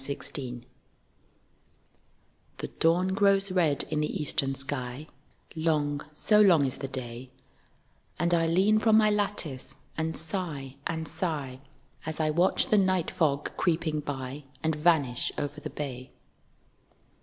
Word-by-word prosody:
SO 140 Hz, +1 st, -2 dB, 0.2 s
LONG 125 Hz, -3 st, -5 dB, 1.9 s
The -, -, -5 dB
dawn 170 Hz, +3 st, +3 dB
grows 195 Hz, 0 st, +3 dB
red 165 Hz, -6 st, +2 dB
in 150 Hz, -, +1 dB
the 150 Hz, -, -1 dB
eastern 135 Hz, -2 st, +1 dB
sky, 135 Hz, 0 st, -4 dB, 0.5 s
(Long, 150 Hz, -3 st, 0 dB
so 210 Hz, +7 st, +4 dB
long 175 Hz, -8 st, +6 dB
is 130 Hz, -, -2 dB
the 135 Hz, -, -4 dB
day,) 130 Hz, -1 st, -7 dB, 0.9 s
And 175 Hz, +1 st, +1 dB
I 165 Hz, -1 st, +3 dB
lean 195 Hz, +6 st, +4 dB
from 220 Hz, 0 st, +5 dB
my 215 Hz, -1 st, +5 dB
lattice 165 Hz, -11 st, -2 dB, 0.2 s
and 160 Hz, 0 st, -2 dB
sigh 155 Hz, -6 st, -4 dB
and 160 Hz, -1 st, -3 dB
sigh, 145 Hz, -8 st, -3 dB, 0.5 s
As 160 Hz, 0 st, -4 dB
I 155 Hz, -1 st, +2 dB
watch 175 Hz, +4 st, +2 dB
the 215 Hz, -, +5 dB
night 185 Hz, -3 st, +1 dB
fog 145 Hz, -2 st, 0 dB
creeping 160 Hz, -3 st, 0 dB
by 140 Hz, -1 st, -5 dB, 0.2 s
And 160 Hz, -1 st, +1 dB
vanish 150 Hz, -6 st, +2 dB
over 145 Hz, +1 st, -4 dB
the -, -, -5 dB
bay. 130 Hz, -3 st, -6 dB
155 Hz, 135 wpm, -28 LUFS, 135-175 Hz, 1.9 s, long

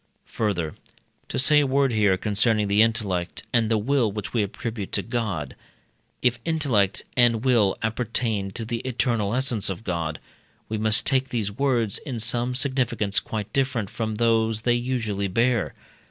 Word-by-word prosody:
Further 90 Hz, -8 st, -2 dB, 0.6 s
(to -, -, -3 dB
say 150 Hz, +3 st, +5 dB
a 145 Hz, -, +2 dB
word 135 Hz, -1 st, +2 dB
here 105 Hz, -3 st, +3 dB
concerning 105 Hz, +2 st, +1 dB
the 100 Hz, +2 st, +4 dB
intellect 100 Hz, -6 st, 0 dB
and 115 Hz, -3 st, +2 dB
the 110 Hz, -, +2 dB
will 120 Hz, 0 st, +1 dB
which 105 Hz, -1 st, -6 dB
we 115 Hz, -, +2 dB
attribute 105 Hz, 0 st, -4 dB
to -, -, 0 dB
God), 105 Hz, -, -3 dB, 0.7 s
if 120 Hz, -1 st, +2 dB
intellect 135 Hz, -, +1 dB
and 120 Hz, -1 st, +3 dB
will 115 Hz, -7 st, +3 dB
appertain 115 Hz, -3 st, 0 dB
to 115 Hz, -, -5 dB
the 115 Hz, +1 st, -3 dB
eternal 115 Hz, -4 st, -1 dB
essence 125 Hz, -7 st, 0 dB
of 95 Hz, +3 st, -5 dB
God, 85 Hz, -5 st, -3 dB, 0.5 s
we 110 Hz, 0 st, -3 dB
must 110 Hz, +2 st, +3 dB
take 135 Hz, -1 st, +2 dB
these 110 Hz, -5 st, -2 dB
words 120 Hz, -3 st, 0 dB
in 130 Hz, -5 st, -6 dB
some 120 Hz, +2 st, 0 dB
significance 125 Hz, -6 st, +1 dB
quite 105 Hz, -2 st, -5 dB
different 130 Hz, -7 st, 0 dB
from 110 Hz, -2 st, -3 dB
those 115 Hz, -1 st, +1 dB
they 120 Hz, -, +3 dB
usually 120 Hz, -5 st, -1 dB
bear. 115 Hz, +3 st, +1 dB
115 Hz, 160 wpm, -24 LUFS, 105-125 Hz, 0.7 s, say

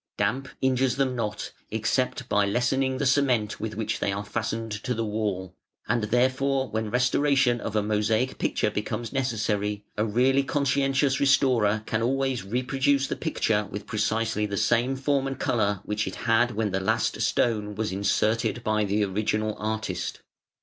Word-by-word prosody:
Damp 120 Hz, +7 st, 0 dB, 0.2 s
injures 130 Hz, -1 st, +2 dB
them 135 Hz, -2 st, 0 dB
not, 110 Hz, -3 st, -3 dB, 0.2 s
except -, -, -1 dB
by 105 Hz, -, +2 dB
lessening 130 Hz, +5 st, +1 dB
the 140 Hz, -, -1 dB
cement 125 Hz, -6 st, +2 dB
with 110 Hz, 0 st, -4 dB
which 110 Hz, 0 st, -2 dB
they -, -, 0 dB
are 100 Hz, +1 st, -4 dB
fastened 115 Hz, +1 st, -3 dB
to 125 Hz, -2 st, -1 dB
the 115 Hz, 0 st, -1 dB
wall, 100 Hz, -4 st, -3 dB, 0.3 s
and 115 Hz, 0 st, +1 dB
therefore 130 Hz, +3 st, +1 dB
when 110 Hz, 0 st, -2 dB
restore 130 Hz, +4 st, +2 dB
tion 120 Hz, -3 st, +3 dB
of 110 Hz, -, -4 dB
a 105 Hz, -, +2 dB
mosaic 110 Hz, +4 st, 0 dB
picture 105 Hz, -, 0 dB
becomes 105 Hz, +3 st, -4 dB
necessary, 105 Hz, -5 st, -1 dB
a 105 Hz, -, +2 dB
really 125 Hz, +5 st, +3 dB
conscientious 140 Hz, -1 st, +1 dB
restorer 125 Hz, -6 st, +3 dB
can 110 Hz, -, -1 dB
always 135 Hz, -1 st, 0 dB
reproduce 135 Hz, +6 st, +1 dB
the -, -, -3 dB
picture 110 Hz, -, 0 dB
with 100 Hz, +2 st, -6 dB
precisely 110 Hz, 0 st, 0 dB
the 100 Hz, 0 st, -3 dB
same 120 Hz, +5 st, +2 dB
form 135 Hz, 0 st, 0 dB
and 135 Hz, -1 st, -5 dB
colour 105 Hz, -5 st, 0 dB
which 105 Hz, +1 st, -1 dB
it -, -, -4 dB
had 120 Hz, 0 st, +3 dB
when 105 Hz, -2 st, 0 dB
the 95 Hz, -, 0 dB
last 110 Hz, +3 st, 0 dB
stone 105 Hz, -3 st, 0 dB
was 110 Hz, 0 st, -2 dB
inserted 105 Hz, +4 st, 0 dB
by 110 Hz, -1 st, +1 dB
the 105 Hz, +1 st, +1 dB
original 110 Hz, +2 st, -1 dB
artist. 110 Hz, -4 st, -3 dB
115 Hz, 165 wpm, -26 LUFS, 105-130 Hz, 0.3 s, tion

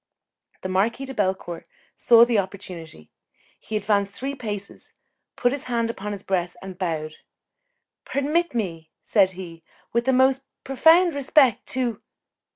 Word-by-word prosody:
The -, -, -3 dB
Marquis 215 Hz, +8 st, 0 dB
de 265 Hz, -, -7 dB
Bellecourt 190 Hz, -5 st, -2 dB, 0.3 s
saw 235 Hz, -1 st, +6 dB
the 235 Hz, -3 st, +2 dB
opportunity; 180 Hz, -, -7 dB, 0.5 s
he 215 Hz, -, -3 dB
advanced 200 Hz, -1 st, 0 dB
three 270 Hz, +2 st, -4 dB
paces, 210 Hz, -6 st, -7 dB, 0.4 s
put 245 Hz, -, +2 dB
his 280 Hz, 0 st, -4 dB
hand 235 Hz, -2 st, 0 dB
upon 210 Hz, -2 st, -6 dB
his 200 Hz, -1 st, -6 dB
breast 180 Hz, -2 st, -1 dB
and 190 Hz, -1 st, -8 dB
bowed. 160 Hz, -4 st, -3 dB, 0.9 s
"Permit 295 Hz, +3 st, 0 dB
me," 165 Hz, -8 st, -3 dB
said 190 Hz, -3 st, +3 dB
he, 170 Hz, -3 st, -9 dB, 0.3 s
"with 235 Hz, +1 st, +1 dB
the 265 Hz, -, +3 dB
most 260 Hz, +1 st, +4 dB, 0.2 s
profound 325 Hz, +6 st, +5 dB
respect, 275 Hz, -3 st, +3 dB
to 245 Hz, -5 st, -1 dB
215 Hz, 140 wpm, -24 LUFS, 185-260 Hz, 0.9 s, saw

